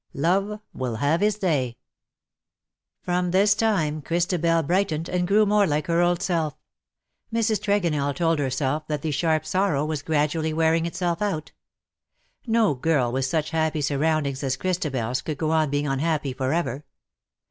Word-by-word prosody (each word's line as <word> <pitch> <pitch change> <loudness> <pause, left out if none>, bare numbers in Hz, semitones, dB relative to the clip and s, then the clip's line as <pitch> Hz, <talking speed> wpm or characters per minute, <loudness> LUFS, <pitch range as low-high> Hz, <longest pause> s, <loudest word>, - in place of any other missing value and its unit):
^E 195 +8 0
AVILL 125 -3 -3
HAVE 145 - +1
HIS 175 - 0 1.3
From 180 0 0
this 200 +3 +4
time 180 -9 0
Christabel 170 +1 +1
brightened 170 -1 0
and 180 -1 -1
grew 210 +3 +4
more 205 -1 +3
like 150 -1 0
her 170 0 +2
old 175 +1 +1
self. 165 -6 -1 0.8
Mrs. 225 -2 +1
Tregonell 170 - 0
told 165 0 +1
herself 140 +2 -1
that 150 -2 -3
the 160 - -1
sharp 155 +1 +1
sorrow 185 -7 +1
was 155 -2 -3
gradually 155 +1 0
wearing 165 +1 +2
itself 170 0 -2
out. 190 -7 -2 1.0
No 225 -6 +3
girl 130 -2 +1
with 130 +1 0
such 155 +3 -1
happy 160 -1 0
surroundings 145 -1 0
as 135 -1 -1
ChristabeFs 135 -9 -2
could 155 -3 -4
go 155 0 -1
on 160 -2 +2
being 145 +1 -1
unhappy 145 0 -1
for 130 0 -2
ever. 145 -4 -1
160 Hz, 150 wpm, -24 LUFS, 145-180 Hz, 1.3 s, this